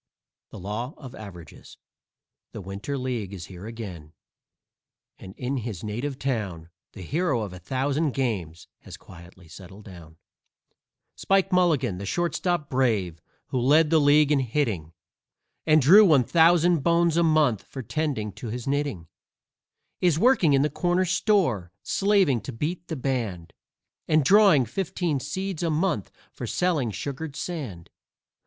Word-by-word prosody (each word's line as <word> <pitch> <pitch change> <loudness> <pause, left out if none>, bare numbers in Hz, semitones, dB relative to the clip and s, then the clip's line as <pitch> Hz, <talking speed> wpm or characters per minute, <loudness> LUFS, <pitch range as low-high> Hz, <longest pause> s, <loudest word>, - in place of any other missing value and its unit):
THE - - -11
LAW 110 - -5
OF 130 -4 -11
AVERAGES 90 -7 -12 0.8
The - - -7
Winter 100 +9 -5
League 120 -7 -4
is 85 -3 -8
here 95 +3 -10
again, 95 -10 -8 1.1
and 95 - -11
in 130 +2 -3
his 110 -7 -5
native 120 +6 -4
town 100 -12 -4 0.2
The 95 - -9
hero 150 - 0
of 100 -3 -7
a 90 - -9
thousand 135 - -1
games 95 - -3
has - - -11
quietly 85 0 -15
settled 95 +4 -13
down. 85 -5 -13 1.0
Spike 195 0 +1
Mulligan, 150 - +2
the 100 - -6
shortstop 175 - -1
brave, 110 - 0 0.3
who 130 - -1
led 150 +5 +4
the 160 - +5
league 145 0 +4
in 145 - +3
hitting, 115 - -2 0.8
And 155 0 +6
drew 195 +10 +8
one 155 -10 +5
thousand 170 +3 +4
bones 170 +2 +2
a 170 - +3
month 155 - +2
for 130 - -9
tending 135 -5 -2
to 110 +5 -9
his 120 +2 -5
knitting, 140 - -2 0.9
Is 175 -4 +2
working 195 - +4
in 135 0 +4
the 150 - 0
corner 175 +4 +1
store, 170 - +1
slaving 195 - +2
to 110 - -7
beat 160 +9 -4
the 160 - -4
band, 115 - -3 0.5
And 155 -3 +3
drawing 195 - +5
fifteen 165 - -2
seeds 185 +6 -4
a 170 - 0
month 155 - -1 0.2
for - - -7
selling 165 -9 0
sugared 140 +6 -6
sand. 120 - -6
135 Hz, 145 wpm, -25 LUFS, 100-160 Hz, 1.1 s, drew